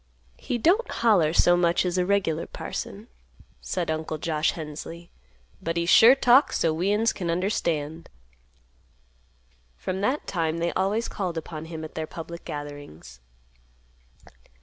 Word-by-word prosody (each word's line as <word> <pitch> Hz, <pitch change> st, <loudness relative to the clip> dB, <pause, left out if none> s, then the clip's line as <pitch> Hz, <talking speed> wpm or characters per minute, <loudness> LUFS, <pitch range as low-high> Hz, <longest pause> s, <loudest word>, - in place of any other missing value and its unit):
"He 245 Hz, -, -2 dB
don't 370 Hz, -, +2 dB
holler 195 Hz, -10 st, +3 dB
so 175 Hz, +1 st, +4 dB
much 175 Hz, +1 st, +2 dB
as 180 Hz, -1 st, -1 dB
a 180 Hz, -, +2 dB
regular 185 Hz, -5 st, 0 dB
parson," -, -, -6 dB, 0.5 s
said 60 Hz, -, -2 dB
Uncle 155 Hz, 0 st, -3 dB
Josh 155 Hz, 0 st, 0 dB
Hensley, 165 Hz, +2 st, -8 dB, 0.5 s
"but 165 Hz, +1 st, -2 dB
he 170 Hz, -, +1 dB
sure 230 Hz, +8 st, +8 dB
talks 270 Hz, +1 st, +4 dB
so 165 Hz, -1 st, +1 dB
we'uns 205 Hz, +7 st, +1 dB
can 175 Hz, -4 st, -4 dB
understand." 165 Hz, -4 st, -2 dB, 1.7 s
From 185 Hz, +1 st, -4 dB
that 260 Hz, +8 st, 0 dB
time 165 Hz, -3 st, -1 dB
they 170 Hz, +1 st, -1 dB
always 200 Hz, +5 st, 0 dB
called 180 Hz, -4 st, -4 dB
upon 160 Hz, -1 st, -6 dB
him 160 Hz, -1 st, -7 dB
at 155 Hz, -, -10 dB
their 160 Hz, -1 st, -4 dB
public 170 Hz, +1 st, -8 dB
gatherings. 145 Hz, -, -8 dB
170 Hz, 135 wpm, -25 LUFS, 155-195 Hz, 1.7 s, sure